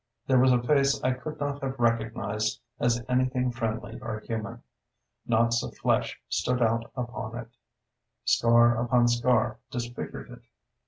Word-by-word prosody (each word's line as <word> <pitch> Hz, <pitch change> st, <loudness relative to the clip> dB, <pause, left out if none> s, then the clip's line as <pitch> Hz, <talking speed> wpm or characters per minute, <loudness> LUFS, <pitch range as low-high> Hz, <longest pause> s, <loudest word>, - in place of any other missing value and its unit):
There 130 Hz, -2 st, +4 dB
was 130 Hz, +1 st, +5 dB
a 120 Hz, -1 st, +2 dB
face 140 Hz, +1 st, +3 dB
I 130 Hz, -, +3 dB
could 150 Hz, +5 st, -6 dB
not 145 Hz, 0 st, -3 dB
have 135 Hz, 0 st, -3 dB
recognized 110 Hz, -3 st, 0 dB, 0.2 s
as 120 Hz, 0 st, +1 dB
anything 125 Hz, 0 st, +1 dB
friendly 115 Hz, -2 st, -4 dB
or 110 Hz, -2 st, -4 dB
human. 110 Hz, -2 st, -5 dB, 0.6 s
Knots 115 Hz, 0 st, +3 dB
of -, -, -7 dB
flesh -, -, 0 dB
stood 125 Hz, +10 st, 0 dB
out 115 Hz, 0 st, +1 dB
upon 120 Hz, -2 st, -5 dB
it; 120 Hz, -2 st, -7 dB, 0.8 s
scar 120 Hz, 0 st, +4 dB
upon 120 Hz, 0 st, +3 dB
scar 120 Hz, -2 st, +2 dB
disfigured 120 Hz, -2 st, -6 dB
it. -, -, -12 dB
120 Hz, 145 wpm, -27 LUFS, 115-125 Hz, 0.8 s, was